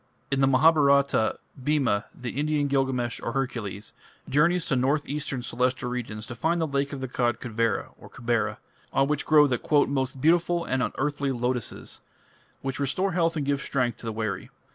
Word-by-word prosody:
In 135 0 +1
the 135 - +5
Mahabharata, 140 -4 +4 0.3
Bhima, 130 -8 +1
the 125 -2 -4
Indian 150 +1 0
Gilgamesh 130 -4 0
or 115 - -3
Hercules, 115 -7 -3 0.3
journeys 170 +5 +3
to 135 - +1
north 135 +4 +1
eastern 140 -3 -3
Celestial 125 +1 -1
regions 110 -4 -4
to 120 - -7
find 165 +8 0
the 165 - +1
lake 140 -1 -1
of 140 -2 -6
the 130 - -2
god 120 -2 0
Kuvera 115 -3 -1 0.2
(Kubera), 120 -1 -1 0.3
on 135 - +2
which 150 0 -1
grow 150 -1 +7
the 125 -4 0 0.3
"most 135 -1 -1
beautiful 170 +3 +2
and 130 0 0
unearthly 140 +1 -1
lotuses", 125 -2 -3 0.6
which 135 0 -3
restore 145 +8 0
health 170 -2 +1
and 145 - -1
give 140 0 0
strength 125 -4 -1
to 115 - -8
the - - -1
weary. 110 -2 -3
135 Hz, 170 wpm, -26 LUFS, 120-145 Hz, 0.6 s, grow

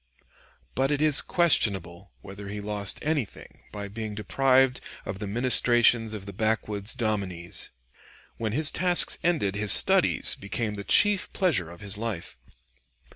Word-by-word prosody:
But 135 +2 -1
it 145 -1 -2
is 150 -2 +4
questionable 100 - +1
whether 100 +1 -11
he 105 +1 -7
lost 105 -1 -2
anything 145 -9 -6
by 100 -1 -8
being 110 +1 -8
deprived 130 +3 0 0.2
of 95 0 -7
the 105 - -6
ministrations 120 0 +2
of 105 -3 -8
the 100 - -10
backwoods 110 0 -3
dominies. 100 -8 -4 0.7
When 110 -2 -4
his 155 +3 +6
tasks 180 0 +2
ended, 155 - -1
his 105 -1 +2
studies - - +5
became 105 +2 -5
the 100 -1 -8
chief 205 - +2
pleasure 145 - -1
of 85 0 -14
his 105 0 -6
life. 110 -7 -6
110 Hz, 140 wpm, -25 LUFS, 100-130 Hz, 0.7 s, his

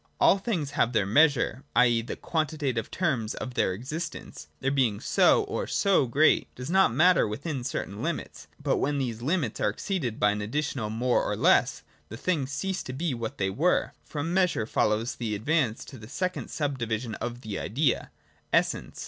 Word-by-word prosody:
All 195 - +5
things 180 -9 -2
have 125 -4 +1
their 105 -3 +2
measure: 135 +1 +3
i. 125 - +6
e. 120 -1 +2
the 115 - -6
quantitative 150 -8 -2
terms 130 -12 -1
of 125 - -6
their 95 - +1
existence, 155 - -6
their 135 - 0
being 125 -7 +1
so - - +4
or - - -3
so 195 -9 +2
great, 145 +7 +3
does 125 +5 -6
not 190 +1 +5
matter 180 -3 +4
within 130 +5 -4
certain 105 -5 -4
limits; - - -4
but - - 0
when 145 +1 0
these 120 -4 -3
limits 140 - -1
are - - +3
exceeded 125 - -3
by 105 - +4
an 105 0 -3
additional 125 0 -2
more 120 +3 +1
or - - -1
less, - - +3 0.3
the 110 - -7
things 145 -2 -1
cease 190 +7 -2
to 130 - -6
be 155 +2 -1
what 115 -2 -5
they 95 -1 0
were. 160 - +1
From 155 +3 -4
measure 180 - +2
follows 110 +2 0
the 110 -3 -3
advance 125 0 0
to 130 - -11
the 105 +1 -11
second 185 +5 -3
sub 145 -3 -2
division 115 0 -2
of 120 +2 -5
the 110 -4 -5
idea. 140 +7 0 0.4
Essence. - - 0
130 Hz, 185 wpm, -27 LUFS, 115-155 Hz, 0.4 s, i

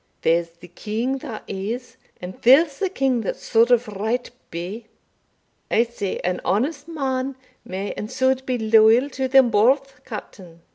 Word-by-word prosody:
There's 170 +1 +2
the 170 +1 -16
king 225 +9 -3
that 235 -6 -7
is 220 +6 -5 0.2
and 180 +1 -7
there's 275 +4 +5
the 385 - 0
king 270 -9 0
that 205 - -3
suld 230 +1 +2
of 245 -1 +3
right 220 +5 -3 0.2
be 190 +7 -6 0.8
I 230 - +4
say, 230 -5 -4
an 180 0 -1
honest 285 - -1
man 270 -4 -2 0.3
may 195 +2 -5
and 210 - -6
suld 260 0 0
be 255 -1 0
loyal 225 +4 +4
to 265 0 -2
them 260 -2 +5
both, 265 +5 +2
Captain. 185 -8 -10
235 Hz, 155 wpm, -22 LUFS, 205-265 Hz, 0.8 s, there's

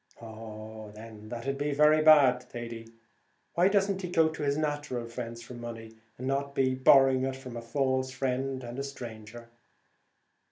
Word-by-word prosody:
"Oh, 110 -1 -9
then, 110 -1 -11
that'd 130 +4 -4
be 145 0 -1
very 150 +1 +5
bad, 145 -5 +6
Thady; 115 -2 -8 0.6
why 175 +2 +4
doesn't 195 -1 +1
he 180 - -4
go 160 -2 +3
to 155 - -7
his 140 0 0
natural 145 -5 -2
friends 115 0 -7
for 125 - -10
money, 115 -2 -8 0.2
and 125 - -6
not 140 +1 -2
to - - +2
be 130 0 +2
borrowing 130 0 +5
it 135 0 -4
of 125 -2 -7
a 120 - -5
false 130 +2 0
friend 130 0 -2
and 120 +2 -6
a - - -2
stranger?" 120 -3 -9
130 Hz, 170 wpm, -29 LUFS, 115-140 Hz, 0.6 s, bad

